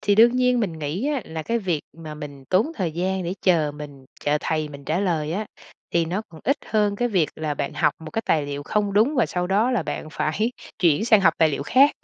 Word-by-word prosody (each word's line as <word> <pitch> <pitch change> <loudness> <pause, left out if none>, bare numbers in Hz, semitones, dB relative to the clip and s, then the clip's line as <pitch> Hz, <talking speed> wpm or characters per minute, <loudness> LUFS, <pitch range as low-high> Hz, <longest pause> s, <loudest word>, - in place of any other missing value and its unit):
thì 205 - +2
đương 235 +3 +6
nhiên 250 -1 +3
mình 195 -6 -1
nghĩ 160 - -3
á 290 -4 0
là 160 0 -5
cái 230 +7 0
việc 180 -8 -1 0.2
mà 160 -2 -8
mình 145 -3 -9
tốn 185 - +2
thời 180 - -2
gian 185 +3 -1
để 175 +2 -2
chờ 160 -5 +3
mình 145 -2 -10 0.2
chờ 145 +1 +1
thầy 155 -1 -1
mình 140 -1 -11
trả 160 +6 0
lời 165 -5 0
á, 210 +4 -2 0.4
thì 170 -1 +2
nó 185 +6 -2
còn 160 -2 -13
ít 275 +5 +2
hơn 210 -2 +1
cái 245 +2 0
việc 185 -9 +2
là 155 -2 -2
bạn 140 0 -3
học 150 - +2
một 160 -1 -9
cái 225 - -2
tài 150 -3 +2
liệu 145 0 -4
không 205 +6 0
đúng 220 +9 +3
và 245 - +3
sau 180 0 -2
đó 205 +6 +2
là 240 -8 +1
bạn 155 - -5
phải 215 +13 0 0.3
chuyển 170 +3 +3
sang 220 -3 +5
học 165 -4 +4
tài 160 - +5
liệu 140 -2 -2
khác. 265 - +5
175 Hz, 255 wpm, -23 LUFS, 155-215 Hz, 0.4 s, đương